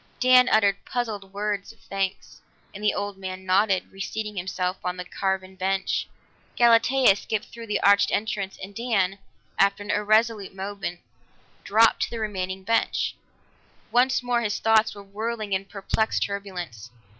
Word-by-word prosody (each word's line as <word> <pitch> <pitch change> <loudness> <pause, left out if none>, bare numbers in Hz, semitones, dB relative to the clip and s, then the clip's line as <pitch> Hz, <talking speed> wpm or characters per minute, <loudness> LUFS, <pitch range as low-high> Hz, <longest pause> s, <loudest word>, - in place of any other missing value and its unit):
Dan 255 0 +6
uttered 200 -2 +3
puzzled 215 -6 -4
words 205 0 -3
of 225 - -22
thanks, 195 -1 -4 0.3
and 205 - -9
the 210 - +4
old 205 -1 -4
man 190 0 -6
nodded, 190 0 +2
reseating 210 +2 -5
himself 185 0 -2
on 180 0 -2
the 180 - -5
carven 190 0 -2
bench; 190 0 -1 0.5
Galatea 240 -1 +5
skipped 215 +1 -3
through 230 -1 -8
the 210 -1 0
arched 200 0 +5
entrance, 205 -2 -2
and 195 +1 -8
Dan, 200 -4 0 0.4
after 200 +1 +3
an 205 - -3
irresolute 215 -1 +2
moment, 195 -2 -5 0.6
dropped 225 +2 +4
to - - +1
the 230 - -5
remaining 190 -3 -3
bench. 230 +4 +1 0.8
Once 255 +1 +3
more 245 -1 +1
his 210 -2 -1
thoughts 220 -1 +3
were 200 - -10
whirling 215 +1 -4
in 190 +1 0
perplexed 205 +2 -1
turbulence. 180 - -6
200 Hz, 150 wpm, -25 LUFS, 190-220 Hz, 0.8 s, Dan